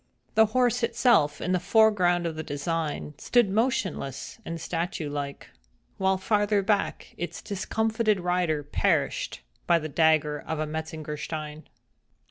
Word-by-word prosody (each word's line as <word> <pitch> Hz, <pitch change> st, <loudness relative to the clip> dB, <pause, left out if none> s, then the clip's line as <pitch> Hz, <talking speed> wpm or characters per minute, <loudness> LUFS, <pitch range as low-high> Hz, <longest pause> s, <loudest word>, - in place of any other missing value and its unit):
The 220 Hz, 0 st, +5 dB
horse 245 Hz, +2 st, +2 dB
itself, 230 Hz, -, +3 dB
in 180 Hz, -, -1 dB
the 185 Hz, -, +2 dB
foreground 180 Hz, -3 st, +3 dB
of 165 Hz, -2 st, -2 dB
the 160 Hz, -, -3 dB
design, 150 Hz, 0 st, -3 dB
stood 240 Hz, -5 st, +3 dB
motionless 210 Hz, -, -1 dB
and 165 Hz, -2 st, -5 dB
statue 165 Hz, -2 st, -3 dB
like—while 145 Hz, -, -4 dB
farther 205 Hz, +1 st, +1 dB
back, 200 Hz, 0 st, -1 dB
its 175 Hz, -, -4 dB
discomfited 220 Hz, +1 st, 0 dB
rider 175 Hz, -4 st, 0 dB
perished -, -, 0 dB, 0.3 s
by 170 Hz, -, +5 dB
the 155 Hz, -1 st, -4 dB
dagger 155 Hz, -1 st, +3 dB
of 160 Hz, -, -4 dB
a 155 Hz, -, -1 dB
Metzengerstein. 155 Hz, 0 st, -5 dB
175 Hz, 125 wpm, -27 LUFS, 155-210 Hz, 0.3 s, The